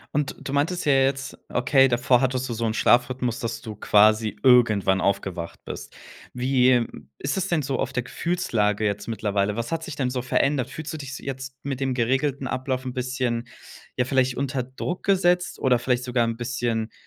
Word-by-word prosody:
Und 145 -2 0
du 135 - -5
meintest 165 +6 0
ja 145 - +4
jetzt, 135 +1 +1
okay, 135 +2 +4
davor 125 +1 +3
hattest 130 0 0
du 120 - -3
so 115 - -3
'n 110 - 0
Schlafrhythmus, 125 0 +2
dass 115 -1 -3
du 110 -1 -7
quasi 105 +1 +3
irgendwann 110 -7 +4
aufgewacht 95 -3 -2
bist. - - -7 0.4
Wie, 125 0 +3
ähm, 120 -2 0
ist 140 - -2
es 190 0 -1
denn 165 -3 +1
so 135 -1 -2
auf - - -2
der 125 - -2
Gefühlslage 115 - -1
jetzt 100 -1 -2
mittlerweile? 105 -2 -1
Was 115 +7 -3
hat 165 0 -2
sich 150 -4 -7
denn 130 -4 0
so 125 -1 -2
verändert? 135 +1 +1
Fühlst 160 0 -6
du - - -4
dich 140 -3 -7
se - - -10
jetzt 130 -1 -6
mit 135 -1 -4
dem 135 -1 0
geregelten 135 +3 0
Ablauf 130 0 -2
'n 125 - -4
bisschen, 125 -2 -2 0.5
ja, 125 - +2
vielleicht 130 -2 +1
unter 135 -1 -1
Druck 130 +8 -5
gesetzt 180 -2 +2
oder 125 -2 +3
vielleicht 125 0 0
sogar 125 -1 +1
'n 115 0 -2
bisschen 120 -2 -2
125 Hz, 195 wpm, -24 LUFS, 115-135 Hz, 0.5 s, ja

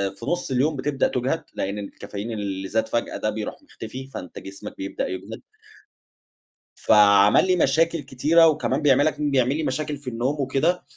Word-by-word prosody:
في 115 - -10
نُص 175 -2 -2
اليوم 140 +5 +1
بتبدأ 140 +1 0
تُجهد، 130 +6 -1
لإن 100 +2 -3
الكافيين 100 +2 -7
اللي 100 -3 -4
زاد 110 +3 0
فجأة 120 - -2
ده 110 - -1
بيروح 110 - -5
مُختفي، 130 - -9
فأنت 90 -9 -8
جسمك 95 0 -10
بيبدأ 95 0 -3
يُجهد. 95 0 -7 1.3
فعمل 105 - +5
لي 185 - +3
مشاكل 165 +1 +2
كتيرة، 160 +6 +4
وكمان 150 -2 0
بيعمل 145 -1 +4
لك 155 - +1
كان 150 -1 -1
بيعمل 130 0 +2
لي 160 - -2
مشاكل 150 +1 -2
في 140 -2 -7
النوم 130 +5 -2
وكده، 145 +7 0
130 Hz, 170 wpm, -23 LUFS, 105-150 Hz, 1.3 s, فعمل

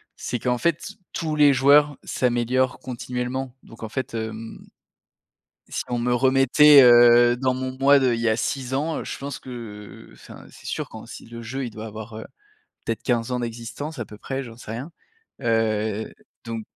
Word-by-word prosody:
c'est 120 - -4
qu'en 125 +1 0
fait, 170 +3 -1 0.2
tous 155 -2 -2
les 145 -2 +6
joueurs 145 +2 +4
s'améliorent 125 +1 0
continuellement. 125 +1 -5
Donc 115 - -14
en 110 - -5
fait, 130 -1 -4
hem, 110 0 -6 1.1
si - - -3
on 120 -1 -1
me 120 +1 +1
remettait, 135 +3 +6
heu, 120 0 +7
dans 130 0 0
mon 130 0 -4
moi 140 +1 +6
de 130 -3 +2
il 115 - -3
y 115 - +1
a 110 - +2
6 130 +2 -3
ans, 155 +4 -1
je - - -6
pense 140 -1 -6
que, 130 - -11 0.6
heu, - - -18
enfin - - -13
c'est - - -14
sûr - - -4
quand - - -11
si - - -11
le 115 0 -9
jeu, 130 +4 -5
heu, 130 - -2
il 120 - -6
doit 110 +1 -8
avoir, 110 +1 -9
heu, - - -8 0.6
peut-être, 115 0 -2
15 120 0 0
ans 125 - -1
d'existence 120 +6 -6
à 120 - -3
peu 105 +1 -12
près, 135 +3 -4
j'en 115 -2 -11
sais 110 - -9
rien, 130 +9 -6 0.5
heu, 110 -2 0 0.3
donc 115 -1 -5
125 Hz, 195 wpm, -23 LUFS, 115-135 Hz, 1.1 s, heu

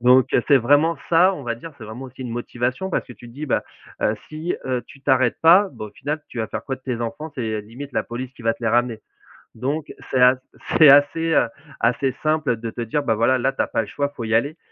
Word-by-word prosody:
Donc, 125 0 +5
heu, 120 - +4
c'est 140 - +7
vraiment 145 +6 +3
ça, 175 +3 +5
on 150 -7 -7
va 115 -1 -1
dire. 155 +7 -10
C'est 110 - -9
vraiment 110 +5 -8
aussi 130 0 -12
une 125 - -5
motivation 125 +8 -3
parce - - -1
que 125 - -11
tu 120 - -14
te 115 - -14
dis: 150 +4 -6
«Bah, - - 0 0.4
heu, 105 - +2
si, 155 +3 -3
heu, 125 -2 -1
tu 140 - -15
t'arrêtes 130 -3 +2
pas, 180 +5 +6
bah, 110 - -7
au - - -12
final, 150 +6 -4
tu - - -8
vas 110 - -1
faire - - -5
quoi 135 - -4
de 130 - -27
tes 125 -3 -3
enfants? 145 +7 -4
C'est 110 -4 -3
limite, 125 +6 -9
la - - 0
police 125 +2 -6
qui - - -14
va 115 0 +2
te 115 - -15
les 115 - +1
ramener.» 120 -1 +1 0.5
Donc, 140 +6 -3 0.2
c'est 130 -1 +1
a 125 +1 +6 0.4
c'est 155 -3 +9
assez, 145 +4 +5
heu, 120 - +4 0.3
assez 125 +3 +1
simple 155 -5 +1
de 115 0 -6
te 120 - -6
dire: 130 +6 -1
«Bah, 115 -5 +1
voilà, 115 +4 +3
là, 130 +2 +1
tu - - -2
as - - 0
pas - - 0
le 105 - -6
choix, 140 +4 -2
faut 120 - -5
y 110 0 -2
aller» 145 +8 +1
130 Hz, 270 wpm, -22 LUFS, 115-145 Hz, 0.5 s, c'est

